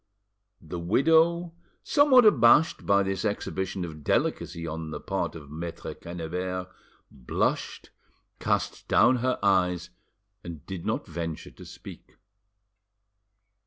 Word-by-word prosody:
The 85 +1 -6
widow, 165 - +3 0.3
somewhat 280 -5 +5
abashed 150 - +5
by 100 0 +4
this 95 0 -2
exhibition 95 -3 -3
of 75 -3 -9
delicacy 85 +2 -1
on 80 0 -5
the - - -5
part 85 - -3
of 75 -3 -11
Maitre 85 +2 -6
Quennebert, 90 +2 -5 0.4
blushed, 65 -3 -2 0.5
cast - - -2
down 130 - +4
her 130 +1 0
eyes, 90 -3 +1 0.5
and 85 -4 -9
did 95 -3 -6
not - - -1
venture 80 -1 -6
to - - -14
speak. - - -12
90 Hz, 115 wpm, -27 LUFS, 85-120 Hz, 0.5 s, somewhat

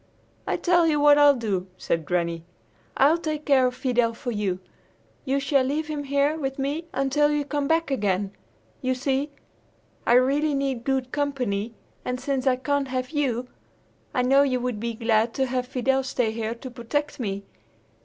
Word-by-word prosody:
"I - - 0
tell 350 -2 +3
you 300 -2 +2
what 290 0 +6
I'll 290 -1 +7
do;" 200 -6 -2
said 165 -2 -2
Granny. 170 -2 -1 0.5
"I'll 300 +5 +5
take 310 -2 -3
care 265 -3 +4
of 250 - -4
Fidel 245 -3 +1
for 245 +1 -4
you! 205 -4 -1 0.7
You 275 +1 +1
shall 275 -1 +2
leave 300 +4 -2
him 295 -2 -3
here 280 +3 +1
with 270 -2 -3
me 290 +5 -2
until 275 +3 +2
you 295 -1 0
come 285 0 -1
back 325 -1 +1
again! 200 -5 0 0.5
You 255 0 0
see, 275 +2 -1 0.8
I - - +5
really 280 +4 +3
need 270 -3 -2
good 265 -2 0
company, 250 -7 -2 0.3
and 250 0 -3
since 270 0 -2
I 255 - +5
can't 275 +2 -1
have 255 0 -3
you, 255 -5 -1 0.6
I 250 -4 +1
know 270 +2 +5
you 260 -3 +2
would 245 -3 -3
be 230 +1 -3
glad 225 0 +1
to 265 - +1
have 250 -1 -2
Fidel 265 +1 +1
stay 250 -3 -1
here 225 0 -3
to 255 +2 -9
protect 290 +6 -3
me. 200 -4 -3
265 Hz, 180 wpm, -25 LUFS, 235-285 Hz, 0.8 s, I'll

